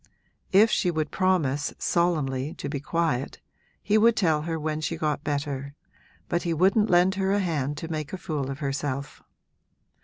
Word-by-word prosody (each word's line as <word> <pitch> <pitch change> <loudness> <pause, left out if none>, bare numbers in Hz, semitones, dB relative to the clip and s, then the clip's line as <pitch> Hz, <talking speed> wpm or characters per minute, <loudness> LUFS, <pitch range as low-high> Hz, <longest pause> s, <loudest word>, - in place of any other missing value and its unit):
If 215 +3 +6
she 180 - +2
would 155 -3 -2
promise, 160 -7 +1
solemnly, 150 -5 0
to - - -5
be 140 0 -3
quiet, 150 -3 -1 0.4
he 215 +1 +3
would 230 +1 +5
tell 160 -7 +2
her 165 - -1
when 155 0 -2
she 165 +1 -2
got 150 -2 -1
better, 140 -2 -3 0.5
but 175 0 0
he 170 -2 -1
wouldn't 195 +6 +3
lend 180 +2 +4
her 190 0 +1
a 200 - +3
hand 150 -6 -1
to 165 - -5
make 155 -3 -4
a 190 - -4
fool 150 -6 -3
of 135 - -4
herself. 140 0 -3
155 Hz, 175 wpm, -26 LUFS, 145-180 Hz, 0.5 s, If